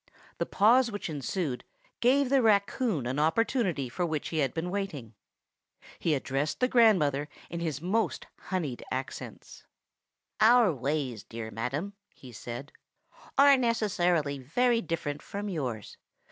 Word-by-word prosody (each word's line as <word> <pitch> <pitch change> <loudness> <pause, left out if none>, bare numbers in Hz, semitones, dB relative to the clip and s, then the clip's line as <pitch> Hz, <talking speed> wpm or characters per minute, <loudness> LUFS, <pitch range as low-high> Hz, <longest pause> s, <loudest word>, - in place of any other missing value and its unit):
The - - -1
pause 235 +4 +4
which 205 -5 -5
ensued 145 -1 -3 0.4
gave 265 +2 +3
the 275 -1 +5
raccoon 205 - +2
an 130 +4 -2
opportunity 180 - +1
for 150 +9 -3
which 155 -4 -2
he 160 - -2
had 135 -4 +1
been 170 +2 -3
waiting. 155 - -4 0.9
He 160 -3 +1
addressed 135 +2 -2
the 250 - +3
grandmother 170 - +3 0.2
in 170 - -3
his 160 -3 -3
most 215 +6 0 0.2
honeyed 160 -10 -2
accents:— 130 +1 -6 0.8
"Our 225 -3 +6
ways, 135 -4 -2
dear 110 -1 -7
madam," 135 - -3 0.2
he 130 - -13
said, 120 +4 -7 0.7
"are 280 0 +8
necessarily 180 - +1
very 235 - +1
different 150 -6 -3
from 205 +1 -5
yours. 125 - -4
165 Hz, 130 wpm, -29 LUFS, 135-215 Hz, 0.9 s, are